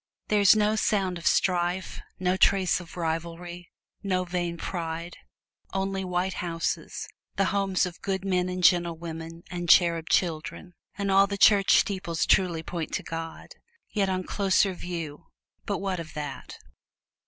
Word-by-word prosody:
There 210 -1 +3
is 200 +1 +7
no 215 0 +2
sound 190 -5 0
of 170 - -2
strife, 180 0 +1 0.2
no 180 0 +1
trace 190 -1 +3
of 175 0 -11
rivalry, 170 +1 -4 0.3
no 185 -2 0
vain 175 -1 -3
pride; 170 0 -4 0.6
only 195 0 -1
white 180 +1 -1
houses 165 -1 -3 0.3
the 195 - +2
homes 195 -2 +1
of 175 -1 -8
good 195 -1 -2
men 185 -1 +1
and 180 0 -4
gentle 170 -1 +4
women, 165 0 -7
and 175 -1 -4
cherub 170 -2 +5
children; 175 +1 -1 0.2
and 200 -1 -1
all 195 +1 +6
the 200 0 -3
church 200 -1 +6
steeples 185 -5 0
truly 175 -4 +2
point 165 -1 -5
to - - -3
God. 165 0 -6 0.4
Yet 200 -3 +1
on 185 0 -1
closer 195 0 +2
view 165 -3 -6 0.4
but 200 - 0
what 190 -2 -2
of 160 -2 -8
that! 145 -2 -6
180 Hz, 155 wpm, -27 LUFS, 170-195 Hz, 0.6 s, is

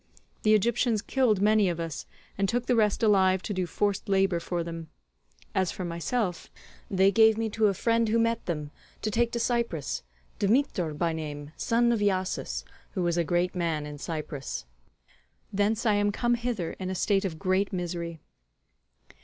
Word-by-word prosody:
The 215 0 +5
Egyptians 230 +1 +2
killed 240 -7 +2
many 210 -2 +4
of 170 -1 -3
us, 165 -3 -5 0.3
and 195 0 0
took 245 +1 0
the 250 - +2
rest 215 -1 +2
alive 190 -3 +4
to 210 - -3
do 185 -2 -1
forced 205 +3 -1
labour 195 -3 +3
for 170 0 -2
them; 165 -1 -7 0.6
as 185 -2 +1
for 185 - -5
myself, 175 +3 -2 0.4
they 190 0 +4
gave 220 +1 +5
me 225 -1 -1
to 220 0 +3
a 200 - +1
friend 230 +2 +2
who 225 - +3
met 230 0 0
them, 150 -4 -3 0.3
to 215 - 0
take 235 +2 +1
to 235 - -1
Cyprus, 230 - -1 0.4
Dmetor 200 - +1
by 165 0 +1
name, 150 -2 -6
son 235 +1 +2
of 230 - +1
Iasus, 185 - -1 0.3
who 185 - -1
was 170 -1 +1
a 170 - +2
great 175 +3 0
man 165 -4 -1
in 150 -1 -8
Cyprus. 145 - -5 0.9
Thence 210 +4 +1
I 215 - +4
am 205 0 +2
come 240 +4 +1
hither 235 -7 -2
in 185 -1 -3
a 190 - -2
state 195 +2 +2
of 175 -5 -3
great 190 +2 +1
misery." 170 -3 -4
195 Hz, 180 wpm, -28 LUFS, 170-220 Hz, 0.9 s, The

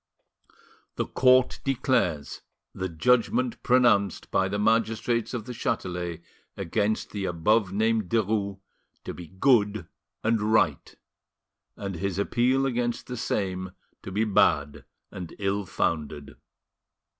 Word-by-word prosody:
"The - - -1
Court 130 0 +3
declares 125 - 0 0.3
the 95 0 -3
judgment 125 - +1
pronounced 120 -7 +2
by 95 0 +2
the 100 - -2
magistrates 115 +2 +1
of 120 -4 -4
the 125 - -6
Chatelet 90 -6 -3 0.3
against 105 +5 -1
the 100 -2 -3
above 95 +4 +1
named 110 -1 +1
Derues 105 -3 0 0.5
to - - -5
be 90 -1 -9
good 105 - +2 0.4
and 115 -1 +2
right, 110 +1 +1 0.8
and 100 -3 -5
his 95 0 -2
appeal 125 +6 +2
against 120 -2 -1
the 125 - -6
same 95 -5 -2 0.3
to 95 - -8
be 105 +4 +1
bad 80 -9 +2 0.3
and 90 -3 -8
ill 100 0 -1
founded. 75 -4 -2
105 Hz, 120 wpm, -26 LUFS, 95-120 Hz, 0.8 s, Court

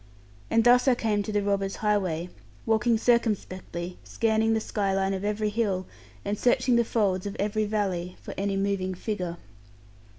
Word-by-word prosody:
And 230 - +3
thus 245 +2 +5
I 255 - +5
came 215 -3 0
to 205 - -4
the 205 -1 +1
robbers' 195 -1 0
highway, 185 -5 0 0.4
walking 225 +1 +3
circumspectly, 190 -7 -1
scanning 225 0 +1
the - - +2
sky 200 -3 -1
line 195 0 +1
of 190 0 -3
every 210 +1 0
hill, 205 -4 -1 0.4
and 205 +1 -2
searching 245 0 +3
the 235 - +4
folds 200 -4 0
of 200 - -5
every 210 +1 0
valley, 190 -4 -2
for - - -8
any 195 0 -1
moving 195 -1 -1
figure. 180 -3 -3
205 Hz, 165 wpm, -27 LUFS, 190-220 Hz, 0.4 s, thus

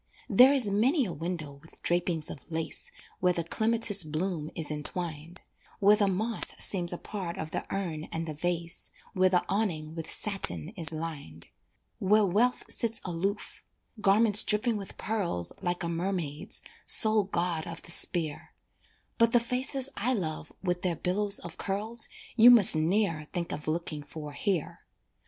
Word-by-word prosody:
There 255 +2 +7
is 255 -8 +2
many 255 - +3
a 180 - -4
window 160 -1 -5
with 160 - -16
drapings 175 -2 0
of - - -8
lace, 165 -1 -5 0.3
Where 180 -1 +3
the 170 - -2
clematis 220 +1 +1
bloom 155 0 -3
is 160 -2 -3
entwined, 160 +2 -5 0.4
Where 205 +1 +6
the 205 -1 +2
moss 215 +4 -1
seems 175 -3 +2
a 175 - -4
part 185 -3 -5
of 160 -3 -5
the - - -4
urn 170 -6 -3
and 165 0 -4
the 155 - -4
vase, 170 +2 -3 0.2
Where 185 -2 +4
the 180 -1 +2
awning 170 -7 -1
with 165 -1 -5
satin 85 - 0
is 165 -1 -2
lined, 155 - -7 0.5
Where 210 +2 +4
Wealth 220 +7 +2
sits 230 -1 0
aloof 190 +4 -3 0.4
garments 210 +1 +6
dripping 220 +2 +2
with 200 -2 -7
pearls 190 - -2
Like 175 +1 -2
a - - -1
Mermaid's 170 -3 -3 0.2
sole 215 -2 +6
god 170 -4 -1
of 165 - -8
the - - -1
sphere, 160 -3 -3 0.6
But 230 0 +4
the 240 - +6
faces 255 +3 -1
I 250 +5 0
love 155 -6 -4
with 180 -1 -1
their 180 -2 0
billows 200 +4 0
of 170 - -8
curls 215 +4 0 0.3
You 235 +1 +8
must 230 -9 +8
ne'er 165 -1 0
think 175 -2 -3
of 150 - -6
looking 155 -1 -2
for 150 +1 -8
here. 175 +1 -2
180 Hz, 160 wpm, -29 LUFS, 160-210 Hz, 0.6 s, You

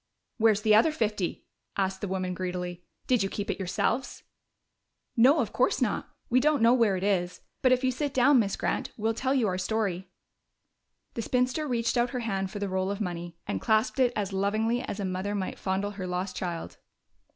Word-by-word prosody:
"Where's 215 -2 +4
the 215 -1 +4
other 225 +9 +6
fifty?" 210 - -2 0.3
asked 190 -1 -1
the 205 - -2
woman 185 -1 -2
greedily. 180 -1 -4 0.2
"Did 250 -4 +2
you 195 - 0
keep 205 0 -3
it - - -5
yourselves?" 195 +7 -1 0.9
"No, 260 +6 +6
of - - -3
course - - +2
not. - - -1 0.2
We 250 +1 +3
don't 290 -2 +2
know 230 +1 +6
where 225 -6 +3
it 185 - -4
is. 180 -3 0 0.2
But 255 - +4
if 255 +1 +3
you 260 - +3
sit 285 +3 -2
down, 265 +1 +5
Miss 200 -3 +1
Grant, - - -2
we'll 220 +1 0
tell 260 +4 0
you 245 -5 +2
our 185 -1 -1
story." 190 -2 -1 1.0
The 230 - -3
spinster 250 +6 0
reached 235 -1 0
out 240 +1 +2
her 250 0 -3
hand 195 -4 -2
for 205 - -7
the 200 0 -2
roll 190 0 -1
of 200 0 -3
money 175 -4 -4
and 95 - -3
clasped 220 +5 +1
it 250 -2 +4
as 200 -2 -2
lovingly 215 +5 +1
as 210 - -5
a 200 - -1
mother 185 +2 -2
might 190 -2 -3
fondle 195 +2 -1
her 195 -2 -6
lost 180 +1 -3
child. 170 -3 -4
205 Hz, 205 wpm, -28 LUFS, 190-240 Hz, 1.0 s, other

